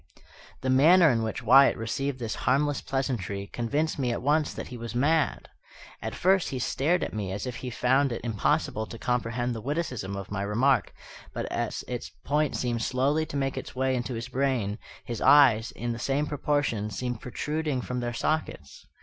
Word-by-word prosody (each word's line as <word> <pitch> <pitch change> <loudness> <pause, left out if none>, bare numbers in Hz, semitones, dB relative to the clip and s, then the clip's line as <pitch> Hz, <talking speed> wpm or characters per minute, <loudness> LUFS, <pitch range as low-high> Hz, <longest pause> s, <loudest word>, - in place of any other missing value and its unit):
The 130 - 0
manner 160 +5 +6
in 115 -2 +1
which 110 +1 -3
Wyatt 135 +4 +6
received 130 +5 -2
this 115 -3 -3 0.2
harmless 145 +2 +2
pleasantry 110 -8 -2
convinced 145 +9 -2
me 125 -3 0
at 115 - -3
once 150 +2 +2
that - - -7
he 125 - -7
was 115 0 -6
mad. 150 +4 +1 0.5
At - - -4
first 190 0 +2
he 135 - -3
stared 150 +7 +1
at - - -4
me 100 -3 -3
as 100 +1 -4
if 125 -2 -5
he 125 - -5
found 130 +3 +2
it 115 - -4
impossible 110 -1 0
to 115 - -8
comprehend 120 0 -1
the 115 - -6
witticism 130 - -3
of 100 -1 -7
my 100 -1 -2
remark; 120 +7 +2 0.4
but - - -2
as - - -2
its - - -5 0.2
point 150 0 +1
seemed 120 -2 -1
slowly 140 +7 +1
to 145 - -4
make 135 -1 -1
its - - -10
way 130 0 +1
into 125 0 -3
his 115 +2 -5
brain, 130 -6 -1 0.3
his 120 -2 -5
eyes, 120 -6 +6
in 120 0 -4
the 115 - -5
same 140 +4 0
proportion, 145 -8 -1
seemed 120 +2 -4
protruding 150 +2 -2
from 125 0 -3
their 120 -1 -2
sockets. 120 - -3
125 Hz, 190 wpm, -27 LUFS, 115-140 Hz, 0.5 s, manner